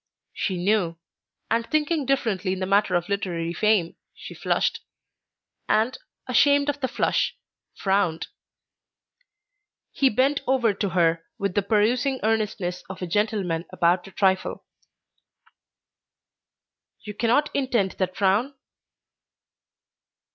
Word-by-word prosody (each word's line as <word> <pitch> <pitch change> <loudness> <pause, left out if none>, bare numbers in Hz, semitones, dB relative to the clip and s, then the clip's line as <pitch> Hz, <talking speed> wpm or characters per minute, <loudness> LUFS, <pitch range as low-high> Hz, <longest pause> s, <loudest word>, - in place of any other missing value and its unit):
She 190 -3 -2
knew, 180 -2 +1 0.5
and 230 +1 +2
thinking 305 -2 0
differently 210 -9 0
in 190 - -5
the 185 - -1
matter 195 -1 +2
of 175 0 0
literary 175 -4 -2
fame, 210 -4 +1 0.2
she - - -10
flushed, - - 0 0.9
and, 225 +4 +2 0.3
ashamed 285 +3 +3
of 290 0 -2
the 260 - 0
flush, - - 0 0.4
frowned. 190 -4 0 1.7
He 270 - +3
bent 265 +6 +1
over 250 -5 +2
to 200 0 -2
her 165 -2 +2
with 200 -4 -2
the 205 - +2
perusing 235 +6 +1
earnestness 210 -5 -1
of 190 -1 -7
a - - 0
gentleman 185 -3 -1
about 175 0 +2
to 195 - -12
trifle. 190 -1 0 2.4
"You 210 - -7
cannot 240 +8 +1
intend 245 -8 +1
that 185 -1 -1
frown?" 210 +8 +1
205 Hz, 115 wpm, -24 LUFS, 185-245 Hz, 2.4 s, ashamed